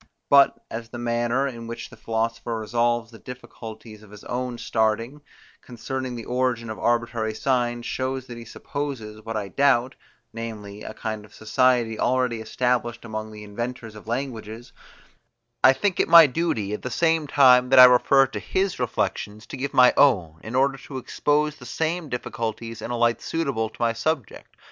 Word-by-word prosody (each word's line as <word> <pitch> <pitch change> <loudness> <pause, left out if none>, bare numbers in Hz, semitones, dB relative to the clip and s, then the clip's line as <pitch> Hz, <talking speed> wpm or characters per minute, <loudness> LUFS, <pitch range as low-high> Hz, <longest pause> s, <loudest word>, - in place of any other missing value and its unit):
But, 140 -1 +6
as 115 0 -6
the 120 - -8
manner, 120 +3 0
in 115 -3 -7
which 115 - -7
the - - -12
philosopher 115 +1 -2
resolves 115 +1 0
the 115 - -13
difficulties 110 -3 -10
of 105 - -16
his 105 0 -13
own 125 0 -4
starting, 115 +6 -1 0.4
concerning 130 +1 -5
the 115 - -7
origin 125 -2 -1
of 110 - -7
arbitrary 120 -2 0
signs, 120 -1 0
shows 130 0 -3
that 120 -2 -9
he 120 - -9
supposes, 115 -5 -6
what 115 0 -4
I 100 -2 -3
doubt, 130 +1 +2 0.4
namely 105 -3 -7
a 110 - -8
kind 110 -2 -5
of 105 - -17
society 115 0 +1
already 125 -3 +1
established 120 +1 -1
among 110 -1 -5
the 105 0 -10
inventors 115 +2 -6
of 105 0 -13
languages; 115 -2 -5 0.9
I 130 - +9
think 195 +5 -1
it - - +3
my 165 -1 +10
duty, 130 -9 -1
at 105 - -4
the 125 - -4
same 160 +2 +1
time 125 -3 +5
that 135 - +4
I 130 - +12
refer 130 +2 +5
to 135 - -6
his 190 -4 -1
reflections, 110 -3 -2
to - - -8
give 140 +2 -3
my 125 -1 +6
own, 90 - +3
in 110 +3 -6
order 135 +1 +2
to 135 +1 -8
expose 150 +3 0
the 125 - -11
same 160 +4 -2
difficulties 115 -2 -5
in - - -5
a 120 - -2
light 120 0 +2
suitable 140 -9 -2
to - - -19
my 115 -1 +1
subject. 140 0 -4
120 Hz, 175 wpm, -24 LUFS, 110-130 Hz, 0.9 s, I